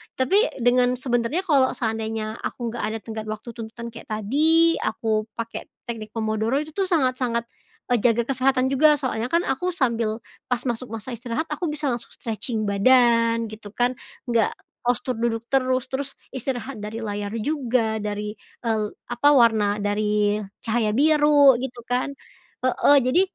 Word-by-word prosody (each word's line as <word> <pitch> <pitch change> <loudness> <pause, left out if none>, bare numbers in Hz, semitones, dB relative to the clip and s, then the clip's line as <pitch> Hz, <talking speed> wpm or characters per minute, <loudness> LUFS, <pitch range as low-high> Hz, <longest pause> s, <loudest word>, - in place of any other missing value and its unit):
tapi 300 +10 +2 0.2
dengan 245 +1 +4
sebenarnya 245 +5 0
kalau 275 -7 +3
seandainya 220 -1 -3
aku 240 -2 -3
nggak 235 -1 -5
ada - - -2
tenggat 220 -1 -6
waktu 215 +2 -6
tuntutan 235 +1 -7
kayak 230 0 -11
tadi, 310 +10 +3
aku 215 -1 0
pakai 230 0 -5 0.2
teknik 215 -2 -6
pomodoro, 220 +4 0
itu 305 - -7
tuh 390 - +2
sangat 265 -8 +1
sangat, 235 -2 0 0.5
eee, 245 - +4
jaga 235 0 +4
kesehatan 260 +1 +1
juga 300 +3 +5
soalnya 230 -3 -1
kan 340 - +4
aku 355 +7 -1
sambil, 230 -6 0 0.2
pas 250 -1 -1
masuk 240 -2 -4
masa 225 +3 -6
istirahat 240 +6 -4
aku 300 +3 -3
bisa 295 -2 -1
langsung 240 -1 -4
stretching 225 0 -3
badan 230 +1 +4
gitu 215 -1 -10
kan, 245 +1 +1 0.3
nggak 230 -2 +2 0.3
postur 245 +1 0
duduk 225 -1 0
terus, 255 -2 +1
terus 270 +1 -3 0.2
istirahat 260 -1 -4
dari 220 +2 -5
layar 205 -1 -4
juga 240 -5 0
dari, 210 0 -4 0.2
eee, 220 -3 0 0.2
apa, 285 +4 +3
warna 215 -5 +4
dari 210 0 +1 0.3
cahaya 225 -1 +1
biru 295 0 +6
gitu 250 -2 -5
kan. 250 +3 -1 0.5
Heeh, 285 +2 +5
jadi 275 +9 +4
240 Hz, 155 wpm, -24 LUFS, 220-265 Hz, 0.5 s, biru